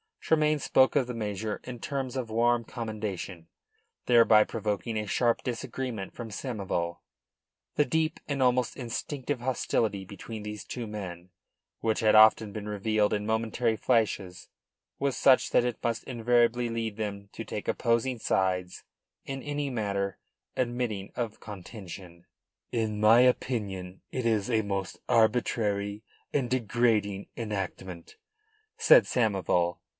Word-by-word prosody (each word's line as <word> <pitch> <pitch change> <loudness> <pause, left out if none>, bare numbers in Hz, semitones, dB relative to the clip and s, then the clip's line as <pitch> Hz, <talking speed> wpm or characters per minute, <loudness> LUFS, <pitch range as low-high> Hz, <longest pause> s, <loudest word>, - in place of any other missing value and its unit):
Tremayne 155 -1 +2
spoke 130 0 +3
of 135 -4 +3
the 125 - -4
measure 105 -1 -3
in 125 -1 -7
terms 135 0 -3
of 125 -4 -3
warm 120 +1 +2
commendation, 105 -7 -5 0.6
thereby 115 -3 +6
provoking 110 +1 -2
a 105 - -1
sharp 115 +3 +1
disagreement 120 -4 -4
from 120 -2 -7
Samoval. 100 -7 -3 0.8
The 150 - +3
deep 160 +1 0
and 140 -2 -1
almost 125 -2 +2
instinctive 130 +2 -4
hostility 115 -5 0
between 105 +3 -8
these 105 0 -6
two 120 -3 -5
men, 95 -4 -7 0.5
which 110 -1 +1
had 110 -1 +4
often 110 -1 +6
been 105 -1 -5
revealed 105 0 +1
in 105 0 -1
momentary 110 +1 0
flashes, 105 -7 0 0.5
was 140 -2 0
such 130 -2 +5
that 120 - +4
it 120 -3 -3
must 115 -1 -1
invariably 120 0 +2
lead 115 -2 -3
them 100 -2 -5
to - - -5
take - - -6
opposing 120 +2 +1
sides 90 -4 0 0.4
in 135 -1 -5
any 145 -1 -2
matter 100 -5 -2 0.4
admitting 120 -5 -2
of 115 -3 -4
contention. 90 -4 -9 0.5
"In 110 -3 -1
my 110 +2 +7
opinion 100 -7 0
it 130 -2 -3
is 110 -1 +1
a 110 -2 +3
most 100 -3 -3
arbitrary 105 -2 +1 0.3
and 130 -4 0
degrading 110 -5 +1
enactment," 95 -5 -5 0.6
said - - +7
Samoval. 95 -7 +1
110 Hz, 130 wpm, -28 LUFS, 100-125 Hz, 0.8 s, my